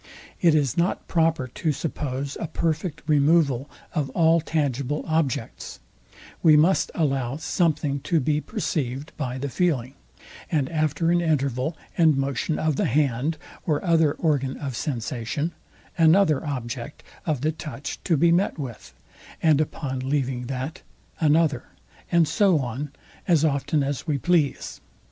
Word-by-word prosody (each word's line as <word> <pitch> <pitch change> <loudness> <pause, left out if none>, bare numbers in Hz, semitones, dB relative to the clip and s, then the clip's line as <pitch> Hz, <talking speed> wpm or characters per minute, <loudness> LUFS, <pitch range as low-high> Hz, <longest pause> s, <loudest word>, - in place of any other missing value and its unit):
It 165 -3 +5
is 145 -2 +1
not 170 +2 0
proper 165 -6 +1
to 155 +5 -2
suppose 140 -2 -3
a 170 - -3
perfect 160 0 -2
removal 145 -3 +3 0.2
of 150 -5 -1
all 165 0 +4
tangible 145 -2 -1
objects: 155 -8 -2 0.6
we 155 -2 +7
must 170 +6 +3
allow 135 -5 0
something 155 -3 0
to 160 +4 +1
be 150 +2 +1
perceived 150 - -3
by 130 -4 -3
the 140 +2 -3
feeling; 135 -5 0 0.6
and 145 -4 +1
after 155 +1 +1
an 175 0 +3
interval 140 -1 0 0.2
and 160 -4 +4
motion 135 +3 -1
of 155 -3 0
the - - +1
hand 140 +3 +1 0.3
or 155 +2 -1
other 165 -4 +4
organ 140 -5 0
of 135 -4 -5
sensation, 125 +4 -3 0.5
another 160 -2 +5
object 125 0 -5 0.2
of 150 -6 0
the 155 +2 +1
touch 145 -3 -7
to 165 -4 +3
be 170 +4 +4
met 180 +3 +2
with; 130 -6 -8 0.4
and 155 -2 +4
upon 140 -3 -3
leaving 130 -2 -1
that, 135 +4 -4 0.4
another; 150 -4 +2 0.5
and 170 -2 +4
so 190 +2 +3
on, 135 +2 -3 0.4
as 165 -4 +4
often 145 0 +1
as 140 +3 -3
we 150 -3 +1
please. 165 -1 0
150 Hz, 140 wpm, -24 LUFS, 135-160 Hz, 0.6 s, we